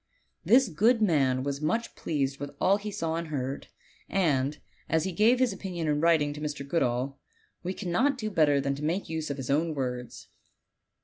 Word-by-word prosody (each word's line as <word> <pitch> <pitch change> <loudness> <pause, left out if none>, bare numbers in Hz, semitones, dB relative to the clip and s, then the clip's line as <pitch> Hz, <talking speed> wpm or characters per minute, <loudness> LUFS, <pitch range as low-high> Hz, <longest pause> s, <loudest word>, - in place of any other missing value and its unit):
This 255 +2 +5
good 215 +8 +3
man 135 -10 +2
Avas 140 +1 -3
much 225 +10 -1
pleased 140 -3 -2
with 145 - -4
all 195 +2 +4
he 210 +1 -6
saw 165 -5 -2
and 170 0 -4
heard; 135 -2 -4 0.4
and, 150 -6 +1 0.3
as 160 -1 +2
he 190 - -2
gave 215 +8 +4
his 250 -4 +2
opinion 180 -4 -4
in 150 0 +1
writing 160 -3 +3
to 150 - -8
Mr. 150 -2 -4
Goodall, 135 -3 0 0.4
wo 180 - -2
3annot 215 +9 0
do 215 -3 -3
better 150 -6 +3
than 140 0 -1
make 170 +5 -1
use 160 -1 -3
of 140 - -3
his 135 -1 -3
own 155 +2 +1
words. 125 -2 -5
155 Hz, 185 wpm, -28 LUFS, 140-190 Hz, 0.4 s, This